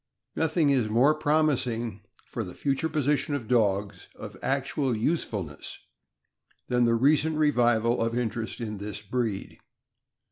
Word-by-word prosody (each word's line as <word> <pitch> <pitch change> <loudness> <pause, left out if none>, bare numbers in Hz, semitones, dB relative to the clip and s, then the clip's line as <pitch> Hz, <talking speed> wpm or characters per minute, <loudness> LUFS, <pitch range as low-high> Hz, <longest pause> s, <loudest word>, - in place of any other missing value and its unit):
is 145 -8 +2
more 125 +7 +4
promising 130 -8 0 0.2
for 115 - -4
the 90 -3 -9
future 140 +3 -1
position 145 -1 0
of 120 -6 -5
dogs 105 -4 0
of - - -9
actual 135 -1 -1
usefulness 105 - -3 0.9
than 125 -1 +3
the 115 0 +3
recent 150 +5 +3
revival 120 -6 +2
of 115 +1 0
interest 115 -1 -3
in 105 -4 -5
this 105 +1 -6
breed. 110 -2 -3
120 Hz, 120 wpm, -27 LUFS, 110-145 Hz, 0.9 s, more